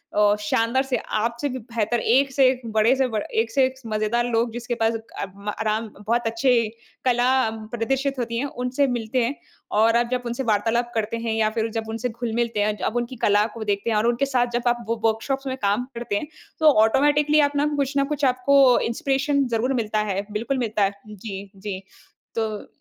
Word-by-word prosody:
अ, 205 0 +4
शानदार 230 +5 +1
से, 265 -2 -1
आपसे 235 +6 -2
भी 260 - -4
बेहतर, 230 0 -1
एक 270 +4 +3
से 265 -1 +5
एक, 255 -1 -2
बड़े 220 +4 +4
से 265 -1 +1
ब 220 -4 -2 0.2
एक 225 0 -4
से 265 +4 +3
एक 260 0 -3
मज़ेदार 215 +2 0
लोग 230 +1 +1
जिसके 240 0 -3
पास 225 0 +1
अ, 225 -2 -6 0.3
आराम 220 +1 0 0.2
बहुत 240 +1 +1
अच्छी 230 0 +2 0.4
कला 245 -1 +3 0.4
प्रदर्शित 270 +4 -1
होती 235 -1 -2
हैं, 260 - -1
उनसे 255 +1 -1
मिलते 240 0 -1
हैं। 270 +5 -2 0.5
और 230 +1 +4
आप 240 0 +1
जब 250 -1 -1
उनसे 240 +3 -3
वार्तालाप 230 +2 +1
करते 225 +1 -1
हैं 225 - 0
या 215 -1 +2
फिर 225 0 +1
जब 220 0 -3
उनसे 225 +3 -2
घुल-मिलते 235 -1 -2
हैं, 210 0 0
अब 210 +4 -2
उनकी 240 +2 -3
कला 205 0 +4
को 230 - -6
देखते 205 +1 -1
हैं 215 - +2
और 215 +2 +2
उनके 240 +3 +2
साथ 255 -3 +1
जब 240 0 -1
आप 240 -1 0
व - - +3
व 225 - -13
वर्कशॉप्स 270 +5 -2
में 260 0 -3
काम 205 +5 +1
करते 235 -3 -3
हैं, 205 - -2 0.3
तो 310 -1 +7
ऑटोमैटिकली 295 +5 +3
आप 290 -1 +4
अपना 285 0 +1
कुछ 280 -1 -1
न 275 - +3
कुछ 290 -1 0
आपको 260 0 +5
इंस्पिरेशन 275 +3 +1
ज़रूर 250 +4 0
मिलता 215 -1 -1
है। 195 +1 -2
बिल्कुल 235 +6 -2
मिलता 220 -4 0
है। 195 - +2 0.2
जी, 200 -1 -7
जी। 195 -1 -5 0.6
तो 220 -2 -3
235 Hz, 210 wpm, -23 LUFS, 220-260 Hz, 0.6 s, तो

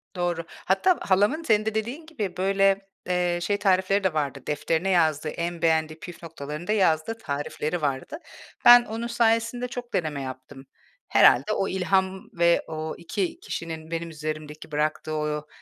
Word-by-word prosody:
Doğru. 175 -2 -1
Hatta 265 - +1
halamın, 205 - +2
senin 215 -5 +2
de 220 - -2
dediğin 240 +9 -3
gibi, 215 - -5
böyle, 195 +1 +2 0.2
eee, 175 -1 +1
şey 200 +4 0
tarifleri 190 0 +2
de 190 - +1
vardı, 140 -3 -1
defterine 160 +5 0
yazdığı, 160 -4 +2
en 170 +1 -4
beğendiği 160 -1 +1
püf 175 -3 -10
noktalarını 155 0 -7
da 210 - 0
yazdığı 190 +1 +2
tarifleri 155 -1 -3
vardı. 140 - -2 0.5
Ben 240 0 +10
onun 225 +1 -4
sayesinde 235 +1 +1
çok 245 0 -7
deneme 155 -5 -1
yaptım. 130 +1 -8 0.4
Herhâlde 135 +11 +5
o 195 - 0
ilham 190 0 0
ve 170 0 +3
o 155 0 -4
2 175 +2 -3
kişinin 160 -1 -6
benim 165 0 -3
üzerimdeki 155 -1 -6
bıraktığı 155 +1 -1
o 150 0 -2
175 Hz, 155 wpm, -25 LUFS, 155-205 Hz, 0.5 s, Ben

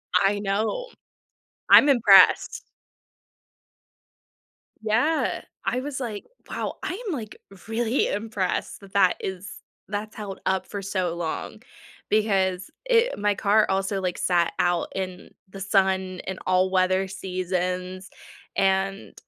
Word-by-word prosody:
I 195 +2 +3
know. 215 - -1 0.8
I'm 290 - +8
impressed. 205 -8 +5 2.2
Yeah. 240 +9 +1 0.2
I 250 - 0
was 280 -1 -5
like, 225 -6 -5 0.2
"Wow. - - -4
I 365 - -3
am 380 - -1
like 220 -7 -6 0.3
really 230 +2 0
impressed 205 -3 -2
that 195 -1 -15
that 190 -3 +4
is 190 +1 -6 0.4
that's 210 +2 -5
held 200 -3 -7
up 190 0 0
for 200 -1 -6
so 185 -3 -2
long 165 -2 -5 0.5
because 195 -1 +1 0.2
i 480 0 +4
my 205 0 +1
car 210 +2 +3
also 195 +1 0
like 180 -1 -2
sat 175 -2 +1
out 175 -1 +1
in 185 -1 -5 0.2
the 195 +1 -10
sun 190 -1 +1
and 190 0 -4
all 185 0 +2
weather 185 0 +2
seasons, 185 0 -3 0.5
and 195 +1 0
195 Hz, 120 wpm, -25 LUFS, 185-215 Hz, 2.2 s, I'm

